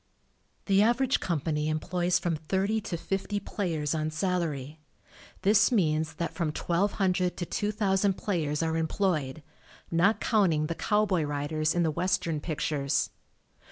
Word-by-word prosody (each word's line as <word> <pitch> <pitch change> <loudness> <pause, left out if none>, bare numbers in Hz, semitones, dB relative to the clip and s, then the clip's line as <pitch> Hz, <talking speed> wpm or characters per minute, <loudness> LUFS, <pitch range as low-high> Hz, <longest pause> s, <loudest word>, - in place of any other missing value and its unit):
The 195 0 +4
average 240 +4 +3
company 155 -2 -1
employs 175 +3 0
from 170 -2 -1
thirty 190 +8 -1
to 180 -4 -4
fifty 195 +4 -2
players 170 -8 -2
on 155 -1 -1
salary. 155 -4 -2 0.6
This 200 +1 +5
means 160 -8 +1
that 170 -2 -3
from 170 -3 -1
1,200 180 +2 0
to 175 - -3
2,000 200 -1 +1
players 160 -6 -1
are 160 0 0
employed, 160 -4 -1 0.5
not 185 +6 +3
counting 180 -9 +2
the 165 - -2
cowboy 205 -1 +1
riders 150 +2 -1
in 175 - +2
the 160 - +1
Western 170 -1 0
pictures. 145 -3 -1
170 Hz, 130 wpm, -28 LUFS, 155-195 Hz, 0.6 s, This